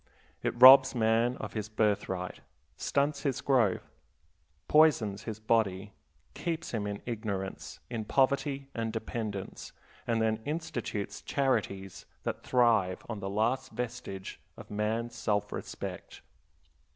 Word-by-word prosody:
It 120 Hz, -, -2 dB
robs 130 Hz, +1 st, +10 dB
man 115 Hz, +2 st, +2 dB
of -, -, -6 dB
his 110 Hz, -1 st, -4 dB
birthright, 100 Hz, -4 st, -1 dB, 0.4 s
stunts 140 Hz, 0 st, 0 dB
his 135 Hz, -4 st, -1 dB
growth, 120 Hz, -8 st, +1 dB, 0.7 s
poisons 135 Hz, -10 st, +4 dB
his 110 Hz, -2 st, -5 dB
body, 105 Hz, -3 st, 0 dB, 0.4 s
keeps 165 Hz, -1 st, -3 dB
him 105 Hz, -3 st, -2 dB
in 100 Hz, 0 st, -5 dB
ignorance, 105 Hz, -5 st, -4 dB
in 115 Hz, -3 st, -4 dB
poverty, 140 Hz, +2 st, +1 dB
and 115 Hz, -1 st, -2 dB
dependence, 110 Hz, -3 st, -5 dB, 0.3 s
and 115 Hz, -1 st, +1 dB
then 110 Hz, 0 st, +1 dB
institutes 150 Hz, -9 st, -4 dB
charities 100 Hz, -9 st, -1 dB, 0.2 s
that -, -, -3 dB
thrive 115 Hz, -7 st, +2 dB
on 110 Hz, -3 st, -4 dB
the 95 Hz, 0 st, -4 dB
last 115 Hz, +6 st, 0 dB
vestige 115 Hz, -6 st, -5 dB, 0.2 s
of -, -, -12 dB
man's 110 Hz, +3 st, -1 dB
self 105 Hz, -3 st, -1 dB
respect. -, -, -7 dB
115 Hz, 120 wpm, -30 LUFS, 105-130 Hz, 0.7 s, robs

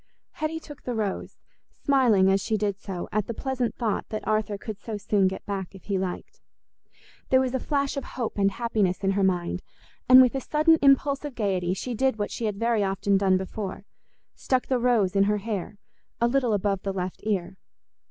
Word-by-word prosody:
Hetty 315 Hz, +1 st, -3 dB
took 295 Hz, -3 st, -12 dB
the 245 Hz, -, -4 dB
rose, 210 Hz, -3 st, -3 dB, 0.3 s
smiling 245 Hz, -9 st, +3 dB
as 195 Hz, 0 st, +2 dB
she 220 Hz, -1 st, 0 dB
did 205 Hz, -1 st, -1 dB
so 190 Hz, -4 st, -5 dB
at 210 Hz, +1 st, -1 dB
the 235 Hz, -, -4 dB
pleasant 255 Hz, -4 st, -2 dB
thought 225 Hz, -4 st, -2 dB
that 215 Hz, -, -5 dB
Arthur 215 Hz, -1 st, 0 dB
could 210 Hz, 0 st, -7 dB
so 215 Hz, 0 st, -5 dB
soon 200 Hz, -1 st, +2 dB
get 190 Hz, -, -5 dB
back 195 Hz, -2 st, -4 dB
if 190 Hz, -, -13 dB
he 195 Hz, -2 st, -1 dB
liked. 185 Hz, -1 st, -5 dB, 0.9 s
There 260 Hz, -, +5 dB
was 260 Hz, -1 st, 0 dB
a 260 Hz, -, 0 dB
flash 280 Hz, +1 st, -1 dB
of 275 Hz, -, -2 dB
hope 235 Hz, -4 st, -4 dB
and 195 Hz, 0 st, +4 dB
happiness 205 Hz, -3 st, -1 dB
in 195 Hz, -, +2 dB
her 200 Hz, +1 st, 0 dB
mind, 180 Hz, -2 st, 0 dB, 0.5 s
and 255 Hz, 0 st, +10 dB
with 255 Hz, -2 st, +6 dB
a 270 Hz, -, -2 dB
sudden 310 Hz, +4 st, +3 dB
impulse 275 Hz, 0 st, +4 dB
of 290 Hz, -4 st, -6 dB
gaiety 185 Hz, -4 st, 0 dB
she 245 Hz, +5 st, -4 dB
did 260 Hz, +1 st, +1 dB
what 205 Hz, -, -2 dB
she 230 Hz, -, -3 dB
had 210 Hz, -2 st, -1 dB
very 230 Hz, 0 st, +1 dB
often 195 Hz, +1 st, +1 dB
done 190 Hz, -1 st, +3 dB
before—stuck 200 Hz, +6 st, -5 dB
the 255 Hz, -2 st, 0 dB
rose 230 Hz, -6 st, +2 dB
in 195 Hz, 0 st, +4 dB
her 210 Hz, +1 st, +1 dB
hair 205 Hz, -1 st, -4 dB, 0.4 s
a 235 Hz, -, +3 dB
little 245 Hz, -2 st, +1 dB
above 200 Hz, -1 st, 0 dB
the 195 Hz, -, -3 dB
left 185 Hz, -1 st, -4 dB
ear. 190 Hz, -3 st, -2 dB
210 Hz, 200 wpm, -26 LUFS, 195-250 Hz, 0.9 s, and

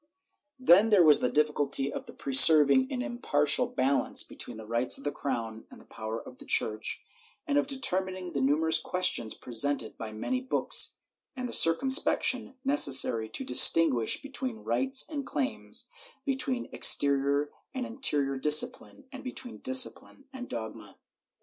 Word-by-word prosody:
Then 220 Hz, -4 st, +4 dB
there 205 Hz, -5 st, +4 dB
was 150 Hz, -3 st, +5 dB
the 125 Hz, -, -1 dB
difficulty 145 Hz, -1 st, -2 dB
of -, -, -8 dB
pre 135 Hz, -, -6 dB
serving 155 Hz, -, +5 dB
an 255 Hz, -2 st, -4 dB
impartial 195 Hz, -, -1 dB
balance 135 Hz, +2 st, 0 dB
between 120 Hz, -, -7 dB
the 110 Hz, -, -11 dB
rights 115 Hz, +3 st, +1 dB
of 135 Hz, -, -11 dB
the 145 Hz, -, -3 dB
crown 115 Hz, -6 st, -6 dB
and -, -, -16 dB
the -, -, -19 dB
power 110 Hz, +1 st, -7 dB
of 125 Hz, -, -15 dB
the -, -, -12 dB
Church, 110 Hz, 0 st, -1 dB, 0.4 s
and 290 Hz, -3 st, -3 dB
of 290 Hz, -, -3 dB
determining 185 Hz, -9 st, -3 dB
the 140 Hz, -, -3 dB
numerous 160 Hz, +4 st, +1 dB
ques 180 Hz, +3 st, -4 dB
tions 115 Hz, -10 st, -1 dB
presented 125 Hz, -1 st, -2 dB
by 110 Hz, -1 st, -7 dB
many 255 Hz, -, -4 dB
books 260 Hz, -, +2 dB, 0.2 s
— -, -, -40 dB
the 250 Hz, -2 st, -6 dB
circumspection 265 Hz, -, +2 dB
necessary 130 Hz, -, +3 dB
to 270 Hz, -, -6 dB
distinguish 165 Hz, -, +3 dB
between 260 Hz, -4 st, -5 dB
rights 265 Hz, 0 st, 0 dB
and 290 Hz, -3 st, -7 dB
claims, 275 Hz, -, -1 dB, 0.3 s
between 265 Hz, -2 st, -3 dB
exterior 140 Hz, +1 st, +2 dB, 0.2 s
and 255 Hz, -1 st, -4 dB
in 240 Hz, +3 st, -12 dB
terior 140 Hz, -, 0 dB
discipline, 150 Hz, -, +2 dB
and 270 Hz, -1 st, -11 dB
between 255 Hz, -1 st, -8 dB
disciphne 260 Hz, +1 st, +1 dB
and 255 Hz, -1 st, -9 dB
dogma. 110 Hz, -3 st, -9 dB
155 Hz, 155 wpm, -27 LUFS, -, 0.4 s, was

